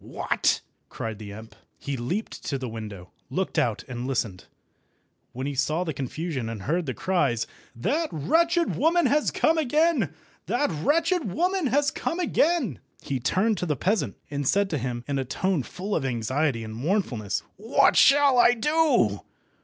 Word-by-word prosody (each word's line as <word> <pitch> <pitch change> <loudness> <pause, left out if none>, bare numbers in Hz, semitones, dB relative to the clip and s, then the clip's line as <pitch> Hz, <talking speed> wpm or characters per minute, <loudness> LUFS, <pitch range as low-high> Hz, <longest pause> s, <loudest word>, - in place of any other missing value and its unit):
"What!" - - 0 0.3
cried 110 -2 -5
the 105 -2 -8
imp. 110 +2 -10 0.2
He 140 - -4
leaped 135 - -4
to 140 - -1
the 130 -1 -5
window, 105 -5 -8 0.2
looked 190 0 -1
out, 115 -4 0
and 125 0 -5
listened. 110 -8 -2 0.9
When 130 +2 -5
he 145 - -2
saw 150 +6 0
the 160 -3 -3
confusion, 135 -1 -4
and 110 -4 -6
heard 165 +2 -1
the 130 - -3
cries—"That 175 - -1
wretched 335 - +2
woman 335 +3 +3
has 300 +1 +3
come 320 0 +2
again! 300 - +2 0.4
that 250 -2 +1
wretched 310 - +1
woman 360 - +1
has 280 +3 +2
come 335 - -3
again!" 315 - +1 0.2
he 135 -2 -2
turned 190 - +1
to 180 - -2
the 150 - +1
peasant, 195 - 0
and 140 -2 -2
said 200 +3 +2
to 155 - 0
him, 120 -1 -3
in 140 -1 -1
a - - 0
tone 180 +6 0
full 195 +9 -4
of 155 - 0
anxiety 130 +1 0
and 110 0 -7
mournfulness— 125 - -1
"What 230 +7 +3
shall 275 -2 +6
I 240 0 +6
do? 255 - +2
160 Hz, 165 wpm, -26 LUFS, -, 0.9 s, shall